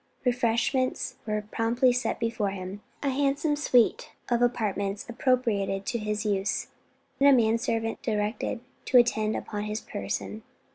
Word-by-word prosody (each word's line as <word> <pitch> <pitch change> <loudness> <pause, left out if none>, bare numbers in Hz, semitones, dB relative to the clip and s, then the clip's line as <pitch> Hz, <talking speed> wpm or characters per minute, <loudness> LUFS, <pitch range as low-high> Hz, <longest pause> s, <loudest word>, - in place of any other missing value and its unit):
Refreshments 245 +1 +1
were 210 0 -1
promptly 240 +3 +2
set 250 - -1
before 230 -3 0
him, 195 +1 -6 0.2
a 280 - +2
handsome 285 +2 +1
suite 250 -6 +2 0.2
of 240 -1 +2
apartments 210 -4 0
appropriated 230 -6 0
to 235 - -1
his 210 0 -2
use, 200 0 0 0.5
and 280 +1 +7
a - - +8
man 230 -3 +4
servant 225 -2 -2
directed 215 +2 -2 0.2
to 255 - +4
attend 220 -3 +3
upon 210 -1 -4
his 210 +1 -3
person. 100 - -4
225 Hz, 140 wpm, -27 LUFS, 210-250 Hz, 0.5 s, a